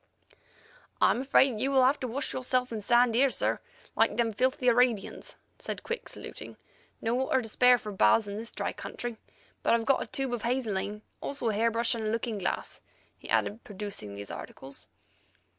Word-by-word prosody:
"I - - +5
am 245 - 0
afraid 265 -3 +4
you 270 - +1
will 265 -2 +5
have 275 +3 +3
to 255 - -3
wash 265 +4 -2
yourself 255 -1 0
in 220 -2 -3
sand 240 +2 +4
here, 265 +4 +5
sir, - - 0 0.4
like - - +3
them 230 -2 +1
filthy 255 +3 +1
Arabians," 240 -3 +2 0.2
said - - -5
Quick, 470 +1 -4
saluting. - - -8 0.4
"No 225 - 0
water 260 0 +1
to - - -5
spare 250 +3 +5
for 220 -3 -7
baths 195 - +4
in 200 0 -5
this 225 +2 -5
dry - - -3
country. 240 -2 -6 0.4
But - - +4
I've 230 -1 -1
got 275 - +3
a - - -4
tube 270 -2 -2
of 240 - -2
hazeline, 215 -4 -2 0.2
also 275 -5 -2
a - - 0
hair 225 +3 +2
brush 230 +1 +1
and 225 -2 -3
a - - 0
looking 225 -1 -2
glass," 185 - -3 0.3
he - - -13
added, 215 +3 0
producing 200 - -7
these 100 0 -7
articles. 135 +1 -7
235 Hz, 190 wpm, -29 LUFS, 215-255 Hz, 0.4 s, I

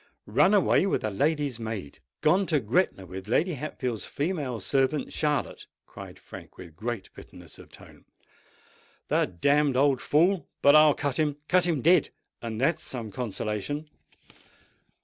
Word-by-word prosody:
"Run 155 - +3
away 195 -1 +3
with - - -1
a 110 - -1
lady's 145 +2 0
maid—gone 110 - -2
to 155 -3 +2
Gretna 115 - 0
with 95 +2 -9
Lady 170 - +1
Hatfield's 130 -5 -4
female 145 -6 -3
servant 135 +6 0
Charlotte!" 150 -2 -1 0.2
cried - - -11
Frank, - - -13
with 85 -4 -12
great 115 0 -5
bitterness - - -13
of - - -14
tone. - - -16 1.0
"The - - +2
damned 140 - +1
old 135 -1 +3
fool!—but 165 -3 +2
I'll 155 -1 +6
cut 145 -2 -2
him—cut 150 +4 +1
him 155 -7 -1
dead—and 145 -9 0
that's 135 +6 +1
some 115 -5 -6
consolation." 120 +7 -4
140 Hz, 130 wpm, -27 LUFS, 110-155 Hz, 1.0 s, I'll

